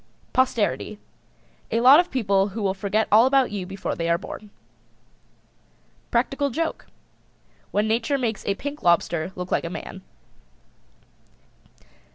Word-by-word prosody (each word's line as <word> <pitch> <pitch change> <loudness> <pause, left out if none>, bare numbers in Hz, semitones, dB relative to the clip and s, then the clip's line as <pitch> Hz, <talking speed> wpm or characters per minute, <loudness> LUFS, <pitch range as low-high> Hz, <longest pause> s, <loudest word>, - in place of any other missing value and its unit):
POSTERITY. 235 -4 0 0.7
A 230 - +1
lot 260 +6 +8
of 355 0 +1
people 200 -6 +1
who 210 +2 -5
will 190 -1 +1
forget 200 +3 -1
all 225 +4 +7
about 265 -3 +3
you 195 -3 -4
before 195 +1 -4
they 165 0 -2
are 170 - +3
born. 210 +3 -9 1.6
PRACTICAL 275 +4 0
JOKE. 325 +6 -3 0.8
When 210 +1 0
Nature 230 +5 +1
makes 230 -5 -2
a 200 - +1
pink 285 +6 -6
lobster 170 0 +1
look 180 0 -6
like - - +1
a 170 - -4
man. 190 +2 -8
215 Hz, 135 wpm, -24 LUFS, 195-260 Hz, 1.6 s, lot